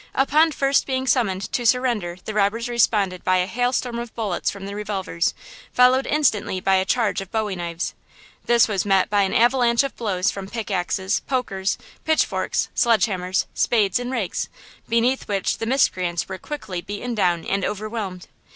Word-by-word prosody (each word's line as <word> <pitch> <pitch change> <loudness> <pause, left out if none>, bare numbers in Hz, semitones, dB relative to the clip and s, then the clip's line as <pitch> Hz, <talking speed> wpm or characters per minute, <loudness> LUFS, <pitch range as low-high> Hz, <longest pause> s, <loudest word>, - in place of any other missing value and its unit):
Upon 305 +4 +4
first 275 -1 +1
being 260 -1 -1
summoned 220 -7 0
to 245 - -1
surrender 235 -8 +1
the 215 - -4
robbers 215 +3 +1
responded 210 -6 +1
by 185 0 +3
a 180 - +2
hail 245 +6 0
storm 245 -2 -2
of 235 -1 -7
bullets 210 -6 -1
from 200 -1 -7
their 200 +1 -6
revolvers, 195 -5 -2 0.4
followed 255 +2 +4
instantly 235 -10 +1
by 190 +1 +3
a 190 - +1
charge 225 -3 +1
of 195 - -9
bowie 215 -3 -1
knives. 170 -1 -4 0.5
This 235 -1 +4
was 200 -4 0
met 195 -1 +2
by 205 -1 +3
an 195 - 0
avalanche 240 +1 +4
of 275 - -4
blows 195 -5 0
from 195 -1 -7
pick 225 -2 -5
axes, 190 +1 0
pokers, 195 -8 -1 0.3
pitch 315 0 +3
forks, - - -1
sledge 230 -5 +3
hammers, 185 -2 -1
spades 210 -3 +2
and 245 +1 -4
rakes, 225 -8 -2 0.4
beneath 235 +3 +1
which 195 -2 -1
the 225 - -3
miscreants 185 -9 +1
were 190 - -6
quickly 195 -12 -5
beaten 205 +6 -5
down 175 -6 +1
and 195 0 -1
overwhelmed. 210 -3 -4
210 Hz, 180 wpm, -22 LUFS, 190-245 Hz, 0.5 s, Upon